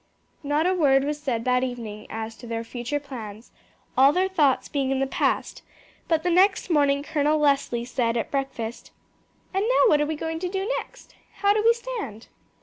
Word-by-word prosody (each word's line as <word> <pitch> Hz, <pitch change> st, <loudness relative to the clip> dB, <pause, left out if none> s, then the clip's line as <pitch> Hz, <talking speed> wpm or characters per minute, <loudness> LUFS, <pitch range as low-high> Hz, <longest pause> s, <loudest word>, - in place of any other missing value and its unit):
Not 295 Hz, +2 st, 0 dB
a 370 Hz, -, +3 dB
word 275 Hz, -6 st, +3 dB
was 295 Hz, +1 st, -3 dB
said 235 Hz, -6 st, -2 dB
that 250 Hz, 0 st, +2 dB
evening 230 Hz, -4 st, -5 dB
as 225 Hz, 0 st, -5 dB
to 240 Hz, -, -11 dB
their 230 Hz, 0 st, -3 dB
future 240 Hz, +5 st, -4 dB
plans, 230 Hz, -6 st, -9 dB, 0.4 s
all 270 Hz, +2 st, +6 dB
their 370 Hz, +4 st, +1 dB
thoughts 300 Hz, -9 st, +2 dB
being 275 Hz, -2 st, -1 dB
in 270 Hz, -, +1 dB
the 270 Hz, -, +2 dB
past; 270 Hz, -, -1 dB, 0.5 s
but 320 Hz, -1 st, +1 dB
the 355 Hz, -, +1 dB
next 375 Hz, +1 st, +3 dB
morning 285 Hz, -2 st, +3 dB
Colonel 300 Hz, 0 st, +1 dB
Leslie 280 Hz, -5 st, +1 dB
said 240 Hz, -1 st, -1 dB
at 230 Hz, -, -3 dB
breakfast: 255 Hz, -5 st, -4 dB, 0.6 s
"And 385 Hz, +1 st, +1 dB
now -, -, +4 dB
what 295 Hz, -, +4 dB
are 295 Hz, -, +1 dB
we 315 Hz, -, -2 dB
going 320 Hz, +1 st, -4 dB
to 360 Hz, +1 st, -3 dB
do 385 Hz, +1 st, -2 dB
next? -, -, -13 dB, 0.3 s
How 405 Hz, 0 st, +5 dB
do 425 Hz, -, +1 dB
we 460 Hz, +1 st, +6 dB
stand?" 460 Hz, -, -7 dB
285 Hz, 195 wpm, -25 LUFS, 245-335 Hz, 0.6 s, all